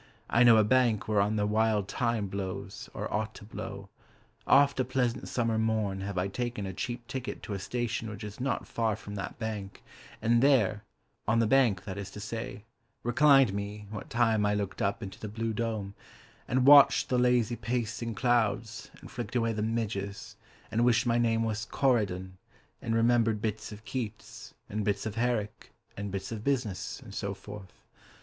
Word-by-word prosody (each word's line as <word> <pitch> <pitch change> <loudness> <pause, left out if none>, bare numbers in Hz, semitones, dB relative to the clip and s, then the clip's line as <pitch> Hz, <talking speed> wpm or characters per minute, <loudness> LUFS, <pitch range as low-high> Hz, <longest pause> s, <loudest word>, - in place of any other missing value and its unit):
I 120 - +4
know 120 -2 +8
a 110 - +6
bank 120 -1 +2
Whereon 105 0 +2
the 105 -1 +1
wild 105 -1 +2
thyme 115 -3 0
blows 100 0 -5
(Or - - -5
ought 110 +1 -2
to - - -11
blow): 100 -2 -7 0.6
Oft 140 -1 +5
of 130 - +1
a - - -23
pleasant 130 -1 0
summer 115 -2 0
morn 110 -3 0
Have 100 -1 -4
I 90 +2 +1
taken 120 0 -3
a 95 - -4
cheap 120 +5 -4
ticket 130 +1 -5
To 105 - -5
a 100 - -3
station 120 +2 -2
which 105 +1 -8
is 105 +2 -8
not 130 0 -1
far 110 -2 0
from 105 -1 -9
that 100 -2 -5
bank, 105 -4 -5 0.4
And 115 +1 +3
there 115 -7 +3 0.5
(on 110 +2 +3
the 115 - +4
bank, 110 -6 +3
that 100 0 -6
is 100 -1 -6
to - - -7
say) 110 0 -5 0.4
reclined 135 -2 +5
me 100 +1 -5
What 105 - -7
time 115 -3 +2
I 105 0 +2
looked 100 -2 -3
up 100 +3 0
into 95 - -8
the 110 - -5
blue 110 +2 -3
dome, 110 -3 -3 0.5
And 125 +1 +2
watched 140 0 +7
the 125 - +2
lazy 125 -1 +3
pacing 115 0 -3
clouds, 115 -3 0
And - - -12
flicked 120 -1 -6
away 115 -2 +1
the 105 - -3
midges, 105 -3 -3 0.4
And 115 +2 +2
wished 120 0 +3
my 120 0 +2
name 115 -1 +2
was 110 0 -2
Corydon, 95 -10 0 0.4
And 115 -1 -1
remembered 115 -1 +3
bits 110 0 -3
of 105 +1 -11
Keats 110 -4 -6
And 105 +1 -3
bits 100 +1 -1
of 110 - -3
Herrick 115 -2 -2 0.2
And 100 0 -4
bits 95 +1 -5
of 110 -2 -5
business, 115 -8 -1
And 110 -6 -11
so 100 -1 -3
forth. 100 0 -11
110 Hz, 185 wpm, -29 LUFS, 100-120 Hz, 0.6 s, know